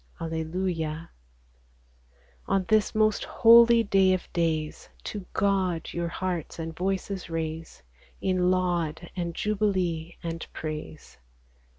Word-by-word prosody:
Alleluia! 165 0 -3 1.4
On 195 -1 +1
this 215 -1 +3
most 215 -1 +2
holy 235 0 +6
day 195 -2 +4
of 185 - -8
days, 160 -3 -1
To 205 -3 -6
God 190 -4 0
your 170 0 -2
hearts 175 -1 -3
and 165 -1 -5
voices 190 +1 -2
raise 160 - -5 0.4
In 185 -1 +1
laud, 175 -3 0
and 170 -2 -3
jubilee, 185 -6 -1
and 165 -1 -4
praise 155 - -7
175 Hz, 105 wpm, -27 LUFS, 165-195 Hz, 1.4 s, holy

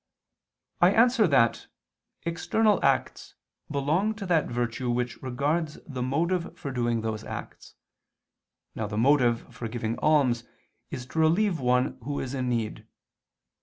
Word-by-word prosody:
I 180 +3 +6
answer 235 -2 +5
that, 115 -6 +2 0.6
External 205 +6 +1
acts - - 0 0.3
belong 155 +10 0
to 205 -2 -6
that 165 -5 +2
virtue 120 +1 -2
which 120 0 -2
regards 145 +5 -1
the 130 -5 -5
motive 170 +7 -1
for 140 - -5
doing 120 -2 0
those 110 -1 -3
acts. - - -8 1.0
Now 110 - -3
the 105 0 -5
motive 120 -1 +2
for 115 - -5
giving 115 0 -3
alms 135 -6 +3 0.5
is 125 - -6
to 160 - -4
relieve 170 +3 +3
one 125 0 +1
who 140 +4 -3
is 130 0 -4
in 130 -2 -1
need. 115 -3 -3
135 Hz, 135 wpm, -27 LUFS, 120-165 Hz, 1.0 s, I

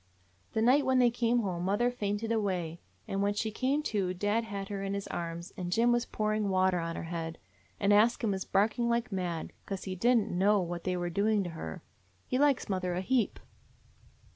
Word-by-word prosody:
"The 220 - +1
night 265 +5 +5
when 260 -1 +2
they 245 -1 +5
came 235 0 +2
home 180 -4 -2
mother 205 +6 +2
fainted 210 -1 -2
away; 180 -7 -1 0.3
and 195 0 -1
when 205 +1 +1
she 220 +1 -1
came 270 +7 0
to 190 -8 -1
dad 205 +5 0
had 200 -2 -5
her 200 -1 -3
in 195 0 -2
his 200 - -3
arms 170 +2 -5
and 180 -1 -4
Jim 235 +5 +4
was 240 0 +1
pouring 215 -1 0
water 185 -1 +2
on 165 0 -3
her - - -4
head, 165 -1 -4 0.4
and 200 0 +3
Ask 225 +4 +4
Him 220 - +2
was 190 -1 -2
barking 220 +4 +1
like 235 -1 0
mad, 175 -4 -3
'cause 195 -2 -4
he 190 -1 -4
did 240 +7 +4
n't 210 - 0
know 200 +4 +3
what 175 -1 -4
they 185 -1 0
were 175 0 -2
doing 205 +2 +2
to 175 - -5
her. 80 - -7 0.4
He 255 - -1
likes 285 -2 +3
mother 185 -2 -1
a 180 - -1
heap." 240 +3 +1
200 Hz, 215 wpm, -30 LUFS, 180-230 Hz, 0.4 s, night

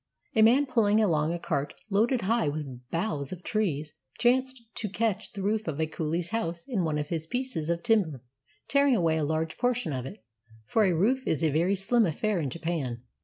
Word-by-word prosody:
A 220 - +5
man 245 +6 +6
pulling 220 -5 +3
along 160 -7 +2
a 175 - -1
cart 145 -4 -2 0.2
loaded 230 +5 +2
high 210 -3 +1
up 145 - 0
with 130 -5 -7
boughs 165 -6 -2
of 180 -1 -7
trees 160 - -1 0.2
chanced 255 0 +2
to 210 - -2
catch 215 0 -1
the 200 -3 -6
roof 215 +1 0
of 155 -2 -3
a 160 - +2
coohe's 160 +2 -2
house 170 -7 -2
in 225 -9 0
one 155 -2 0
of 150 0 -3
his 160 -2 -3
pieces 245 -9 -3
of 170 0 -1
timber, 180 - +2 0.4
tearing 280 -2 +4
away 165 -5 +2
a 155 - 0
large 160 +1 -2
portion 245 - 0
of 130 0 -3
it 110 - -11 0.4
(for 220 - +3
a 180 -3 +2
roof 255 +10 +1
is 155 - 0
a 155 - +3
very 170 +7 +2
slim 215 +3 +3
affair 200 +5 0
in 145 -4 -1
Japan) 140 -6 -3
175 Hz, 210 wpm, -28 LUFS, 155-225 Hz, 0.4 s, man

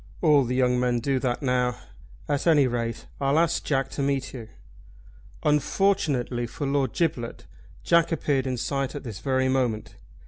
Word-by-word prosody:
"All 150 -5 +5
the 125 +1 -2
young 125 -1 +2
men 125 -1 +1
do 135 +2 0
that 125 +1 -2
now. 125 -2 +1 0.5
At 145 +3 -1
any 150 -4 +5
rate 115 -2 -2
I'll 140 +2 +2
ask 165 0 +2
Jack 135 -2 0
to - - -3
meet 140 -1 -1
you." 120 -4 -8 1.0
Unfortunately 150 -6 +1
for 130 +6 -5
Lord 135 -3 0
Giblet 130 -9 -2 0.4
Jack 170 0 +3
appeared 140 -4 0
in 130 -1 -2
sight 135 +3 -2
at 145 - -6
this 110 -6 -7
very 130 +2 +1
moment. 125 -5 -1
130 Hz, 165 wpm, -25 LUFS, 125-145 Hz, 1.0 s, All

